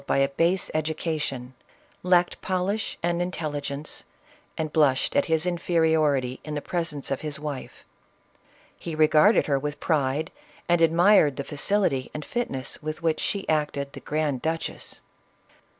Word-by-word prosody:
by - - +2
a 135 0 +3
base 170 +6 +1
education, 155 -5 -2 0.5
lacked 180 -1 +2
polish 190 +3 -1
and 175 0 +1
intelligence, 150 -4 -3 0.5
and 155 -2 -3
blushed 140 -5 +3
at - - +3
his 160 0 +1
inferiority 160 -7 +1
in 150 -1 -5
the - - -1
presence 150 -4 -3
of 135 - -1
his 150 -2 -4
wife. 145 -3 -7 0.9
He 165 - -6
regarded 155 +7 +5
her 140 -2 +1
with 145 +1 -4
pride, 150 -1 0 0.4
and 175 -1 +3
admired 165 -2 +5
the 140 - -3
facility 145 -2 0
and 150 - -5
fitness 140 - -3
with 155 +2 -5
which 160 -1 +1
she 200 -1 -2
acted 150 -3 -1
the - - -8
grand 150 -4 -1
duchess. 165 +1 -3
155 Hz, 140 wpm, -26 LUFS, 140-170 Hz, 0.9 s, regarded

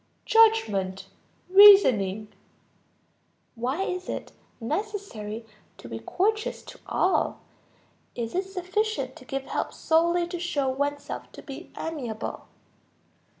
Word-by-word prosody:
Judgment, 215 - +3 0.4
reasoning. 255 - +6 1.2
Why 260 +10 -2
is 365 -1 -4
it - - -5 0.3
necessary 235 - -4 0.3
to - - -11
be 115 -1 -6
courteous 425 - -1
to - - -12
all? 370 - +1 0.7
Is 230 -2 -4
it 375 +2 0
sufficient 375 - -2
to - - -14
give 270 +1 -4
help - - -3
solely 340 +2 +2
to 350 -1 -4
show 295 -6 -1
oneself 285 +2 -3
to - - -11
be 280 +5 -9
amiable? 255 -9 -5
315 Hz, 105 wpm, -26 LUFS, 230-385 Hz, 1.2 s, reasoning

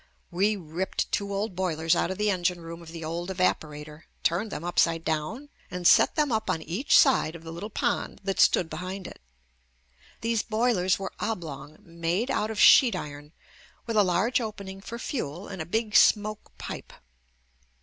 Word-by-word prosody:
We 200 +5 +2
ripped 175 0 -3
two 200 0 -1
old 200 -1 -2
boilers 165 -3 +1
out - - 0
of 190 - -4
the 210 0 +2
engine 180 -1 0
room 165 +1 -8
of 165 -1 -11
the 165 -1 -7
old 170 +3 -4
evaporator, 155 -4 -2 0.2
turned 190 +6 0
them 150 - -5
upside 165 -1 +1
down 160 - -3 0.2
and 180 -1 -6
set - - +6
them 300 -3 +1
up 220 -1 -1
on 160 - -1
each 185 - +2
side 210 - +4
of 165 - -10
the 165 - -8
little 175 +6 -6
pond - - -2
that 195 0 -2
stood 175 - +4
behind 185 +4 -6
it. - - -10 1.0
These 230 -1 +1
boilers 215 -5 +1
were 195 - -6
oblong, 155 -8 -5
made 170 +9 -2
out 215 - 0
of 220 -2 -4
sheet 250 -4 +7
iron, 145 0 -7 0.5
with 230 - -3
a 210 - +6
large 195 +8 +1
opening 200 -3 -6
for 230 +3 -7
fuel, 200 - -4
and 190 -4 -6
a 160 - -6
big 220 +3 -1
smoke 215 0 +3
pipe. - - -7
185 Hz, 180 wpm, -27 LUFS, 165-215 Hz, 1.0 s, sheet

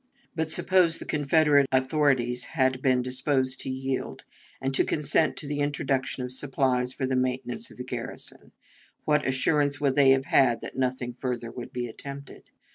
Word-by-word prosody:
But, 160 -1 -1
suppose 180 -3 +3
the - - -7
Confederate 145 -1 +3
authorities 130 -2 +1
had 130 -1 +2
been 130 -2 +2
disposed 130 0 0
to - - -5
yield, 130 0 -4 0.4
and 135 0 -2
to - - +3
consent 150 +1 +1
to - - -7
the 145 0 -3
introduction 135 -2 -1
of 125 - -5
supplies 130 -2 0
for 130 - -3
the 130 0 -1
maintenance 130 - -2
of - - -15
the 125 - -5
garrison, 125 -2 -7 0.5
what 150 -2 +2
assurance 145 +1 +1
would 140 -2 +2
they 140 -1 +5
have 135 0 +4
had 125 -5 +3
that - - -8
nothing 125 -1 -2
further 120 -2 -4
would 120 0 -8
be 125 -1 -3
attempted? 140 +4 -10
130 Hz, 170 wpm, -27 LUFS, 125-145 Hz, 0.5 s, they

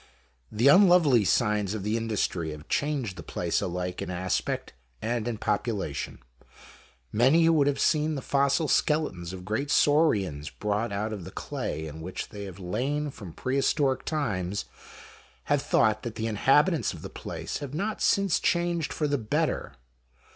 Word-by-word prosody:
The 115 +5 +2
unlovely 170 - +6
signs 105 -1 +1
of 105 - -4
the 105 +2 0
industry 105 -7 -1
have 75 0 -9
changed 140 -10 -1
the - - -6
place - - -1
alike 90 0 -3
in - - -4
aspect 90 +1 -2 0.3
and 120 0 -2
in 120 -2 -2
population. 105 - -2 0.9
Many 135 +9 +4
who 165 -2 +4
have 140 -1 0
seen 155 -1 +2
the 135 - -5
fossil 140 +2 +2
skeletons 145 - +1
of 90 -1 -8
great 110 +8 -2
saurians 100 - +2
brought 105 +4 -2
out 105 +2 -2
of 100 -4 -6
the - - -8
clay 80 +1 -4
in 80 +1 -8
which 90 +3 -5
they 100 -1 -7
have 95 -2 -9
lain 135 +11 -2
from 100 -9 -10
pre 130 +10 -2
historic 135 -1 +1
times, 100 - -2 0.8
have - - +1
thought 110 0 +2
that 115 -2 -6
the 110 - -3
inhabitants 140 - +3
of - - -10
the - - -4
place - - -5
have 145 0 -6
not 205 +6 -2
since 195 -4 +3
changed 175 -2 0
for 150 - -1
the 145 -1 0
better. 110 -2 -1
115 Hz, 160 wpm, -27 LUFS, 95-145 Hz, 0.9 s, unlovely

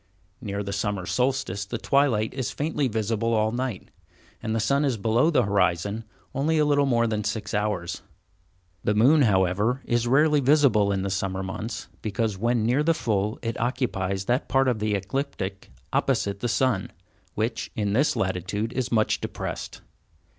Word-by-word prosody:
Near 100 0 -3
the 100 0 -4
summer 100 -2 -2
solstice 125 -2 0
the 105 +5 -4
twilight 120 -4 +2
is 130 -1 -2
faintly 150 -2 -1
visible 115 0 0
all 110 0 +2
night, 120 -4 -4 0.5
and 110 - -2
the - - +1
sun 140 +7 +2
is 135 -5 +1
below 115 +8 +2
the 165 - +3
horizon 100 +2 0 0.3
only 155 +4 +1
a 150 - +4
little 145 -1 +3
more 115 -3 +3
than 110 -2 -1
six 105 0 -3
hours. 105 -5 -1 0.8
The 105 - +1
moon, 135 +8 +5
however, 105 +3 +2
is 120 0 +1
rarely 150 +4 +4
visible 130 -7 +4
in 95 -1 -1
the 100 - -2
summer 95 0 -2
months, 105 +5 -5
because 110 0 -1
when 115 +2 +1
near 125 +5 +2
the 165 +2 +2
full 105 -3 -1
it 115 0 -3
occupies 100 -6 -1
that 125 +4 0
part 135 0 +3
of 120 -4 +1
the 105 -1 0
ecliptic 100 -2 -4 0.2
opposite 100 -1 0
the 120 - -1
sun, 120 -8 +1 0.5
which, 115 +2 -2
in 100 -2 -1
this 140 +7 +2
latitude, 95 +5 -2
is 130 -2 -2
much 110 -2 +2
depressed. - - -5
110 Hz, 170 wpm, -25 LUFS, 100-130 Hz, 0.8 s, moon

